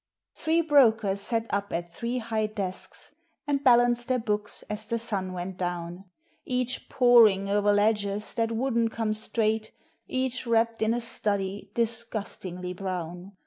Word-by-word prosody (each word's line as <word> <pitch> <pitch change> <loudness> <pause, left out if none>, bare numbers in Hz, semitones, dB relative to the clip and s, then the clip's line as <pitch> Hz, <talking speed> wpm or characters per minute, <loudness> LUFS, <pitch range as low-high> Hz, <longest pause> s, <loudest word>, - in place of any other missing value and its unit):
Three 325 +1 +1
brokers 225 -10 +4
sat 225 +2 0
up 200 0 -1
at 170 0 -3
three 235 +1 -3
high 220 -2 -1
desks, 195 -4 -5 0.3
And 285 -1 0
balanced 240 -2 +4
their 255 -1 +2
books 210 -3 -2
as 210 +1 -5
the 230 - 0
sun 200 -5 -3
went 180 +1 -5
down; 175 +1 -4 0.4
Each 250 -2 -2
"poring" 230 -6 +5
o'er 205 0 +3
ledgers 205 0 +1
that 230 -1 0
wouldn't 230 -1 +1
come 220 -2 -1
straight, 220 0 -1 0.4
Each 255 -1 -2
wrapped 230 0 +2
in 220 +1 +2
a 240 - -2
study 200 -3 -1
disgustingly 215 -6 -3
brown. 180 0 -5
220 Hz, 145 wpm, -27 LUFS, 195-235 Hz, 0.4 s, poring